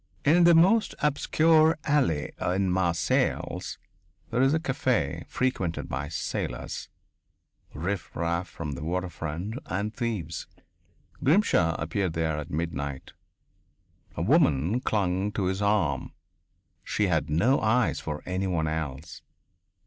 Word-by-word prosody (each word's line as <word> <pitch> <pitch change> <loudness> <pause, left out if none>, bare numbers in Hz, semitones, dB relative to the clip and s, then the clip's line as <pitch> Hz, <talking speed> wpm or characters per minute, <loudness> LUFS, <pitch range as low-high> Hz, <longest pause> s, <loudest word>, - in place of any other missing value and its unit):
In 170 +4 +6
the 170 -1 +7
most 195 +7 +4
obscure 155 +2 +4
alley 130 - +1
in 95 +1 +1
Marseilles 85 -3 0 0.5
there 120 +2 +1
is 135 +1 +4
a 160 - +2
caf 130 - -1
frequented 95 -10 -1
by 65 +3 -3
sailors, 80 - -4 0.9
riff 90 +5 -4
raff 85 +2 -1
from 80 -2 -6
the 70 +2 -6
waterfront 90 - -3
and 100 +3 -2
thieves. 100 - -3 0.8
Grimshaw 130 - +3
appeared 85 +1 -1
there 80 -2 -1
at 75 - -7
midnight. 70 -4 -4 1.0
A - - -2
woman 100 - +3
clung 100 -4 0
to 100 - -1
his 95 +2 -1
arm. 100 -10 +1 0.7
She 105 - 0
had 80 -4 0
no 105 - +3
eyes 110 +2 +2
for 75 -1 -5
any 95 +1 -2
one 80 -4 0
else. 80 -1 -4
90 Hz, 120 wpm, -27 LUFS, 80-125 Hz, 1.0 s, the